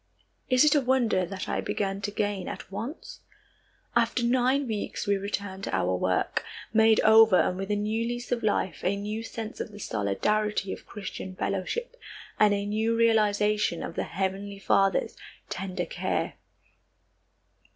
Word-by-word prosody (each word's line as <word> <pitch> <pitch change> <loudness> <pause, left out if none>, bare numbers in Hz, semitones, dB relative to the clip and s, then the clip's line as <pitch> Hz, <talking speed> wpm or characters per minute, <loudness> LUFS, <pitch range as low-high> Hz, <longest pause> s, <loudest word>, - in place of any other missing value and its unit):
Is 255 +2 +5
it 300 - +5
a 295 - +4
wonder 240 -8 +2
that 190 +1 -5
I - - -1
began 195 -1 -2
to 200 - -2
gain 205 -2 -2
at - - -7
once? 290 - -6 0.8
After 235 +1 +2
nine 255 +3 +2
weeks 215 -2 -3
we 200 -1 +2
returned 200 -1 -4
to - - -2
our 90 +1 +1
work, 90 0 0 0.3
made 220 0 +5
over 220 -2 +7
and 180 - +2
with 195 +2 -5
a 210 - +2
new 215 +3 -1
lease 240 0 -5
of 240 -1 0
life, 195 -5 0
a 190 +2 +1
new 210 +2 -4
sense 225 -1 -6
of - - -4
the 205 - -11
solidarity 200 - 0
of - - -11
Christian 190 -2 -7
fellowship, 200 - -3 0.4
and 210 -1 +6
a 200 0 0
new 220 +2 0
realization 210 -4 +2
of - - -5
the - - -2
heavenly 195 +2 -3
Father's 195 0 +2 0.3
tender 185 -2 -3
care. - - -2
210 Hz, 160 wpm, -27 LUFS, 195-230 Hz, 0.8 s, over